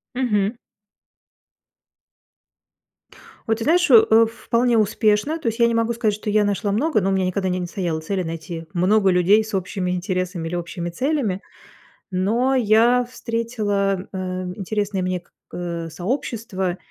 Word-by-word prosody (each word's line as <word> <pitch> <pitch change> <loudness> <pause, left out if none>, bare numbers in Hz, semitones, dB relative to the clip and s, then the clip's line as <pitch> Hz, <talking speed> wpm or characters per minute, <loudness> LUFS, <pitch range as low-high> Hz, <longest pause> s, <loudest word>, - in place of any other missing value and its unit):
Мгм. 215 -4 +1 2.9
Ой, 225 -2 +1
ты 225 - -4
знаешь, 350 +5 +3
э, 225 -1 +7
вполне 235 +1 0
успешно. 215 +7 +1
То 280 - -2
есть 225 +1 -3
я 235 - +5
не 235 - +1
могу 230 0 +1
сказать, 225 -3 0
что 210 0 -4
я 210 0 +3
нашла 205 0 -1
много, 265 +3 +1
но 195 - 0
у - - +1
меня 190 -1 +1
никогда 190 +1 -1
не 180 0 -1
не 180 - -3
стояло 170 -3 -3
цели 185 +4 -2
найти 165 0 -6
много 195 +3 +3
людей 185 +4 +4
с 215 - -8
общими 185 -1 -2
интересами 180 -1 -2
или 170 - -5
общими 175 0 -4
целями. 250 - -1 0.7
Но 230 +9 +1
я 240 +2 +4
встретила, 215 -6 -2
э, 190 - -6 0.4
интересные 205 -1 -2
мне 185 0 -1
к 175 - -28 0.2
э, 170 -2 -4
сообщества 190 - -3
205 Hz, 155 wpm, -22 LUFS, 185-230 Hz, 2.9 s, э